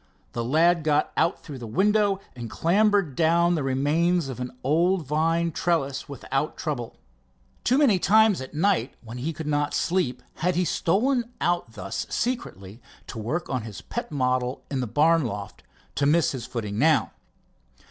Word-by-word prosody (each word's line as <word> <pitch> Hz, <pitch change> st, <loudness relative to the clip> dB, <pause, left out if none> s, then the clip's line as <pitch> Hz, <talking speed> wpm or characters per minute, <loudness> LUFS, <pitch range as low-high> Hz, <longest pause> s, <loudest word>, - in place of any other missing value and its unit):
The 120 Hz, -, -3 dB
lad 165 Hz, +6 st, +3 dB
got 150 Hz, -1 st, +1 dB
out 165 Hz, -, +1 dB
through 140 Hz, -4 st, -8 dB
the 120 Hz, -, -7 dB
window 200 Hz, -, +2 dB, 0.2 s
and 120 Hz, -2 st, -6 dB
clambered 195 Hz, -, +2 dB
down 170 Hz, +3 st, +3 dB
the 160 Hz, -, 0 dB
remains 145 Hz, +5 st, +1 dB
of 130 Hz, -, -6 dB
an 125 Hz, 0 st, -3 dB
old 170 Hz, +5 st, +2 dB
vine 165 Hz, +4 st, +1 dB
trellis 140 Hz, -6 st, -1 dB
without 135 Hz, +2 st, -3 dB
trouble. 130 Hz, -7 st, -4 dB, 0.7 s
Too 255 Hz, -, +3 dB
many 250 Hz, -11 st, +4 dB
times 215 Hz, -2 st, +4 dB
at 130 Hz, -, -9 dB
night 160 Hz, -, +1 dB
when 120 Hz, +2 st, -8 dB
he 150 Hz, +6 st, -2 dB
could 160 Hz, 0 st, -7 dB
not 145 Hz, 0 st, 0 dB
sleep 140 Hz, -9 st, 0 dB
had 180 Hz, +1 st, 0 dB
he 180 Hz, +1 st, +1 dB
stolen 235 Hz, +9 st, +1 dB
out 175 Hz, -10 st, 0 dB
thus 100 Hz, -2 st, -5 dB
secretly 120 Hz, -, -3 dB, 0.2 s
to -, -, -7 dB
work 150 Hz, +11 st, -2 dB
on 130 Hz, -2 st, -2 dB
his 110 Hz, -2 st, -8 dB
pet 240 Hz, -7 st, -5 dB
model 125 Hz, -2 st, -1 dB
in 135 Hz, -, -1 dB
the 125 Hz, -, -2 dB
barn 155 Hz, +7 st, +3 dB
loft, 100 Hz, -4 st, -6 dB, 0.3 s
to 140 Hz, -, +1 dB
miss 165 Hz, +2 st, +3 dB
his 125 Hz, -4 st, -6 dB
footing 105 Hz, -3 st, -4 dB
now. 150 Hz, -5 st, +3 dB
155 Hz, 170 wpm, -25 LUFS, 130-175 Hz, 0.7 s, many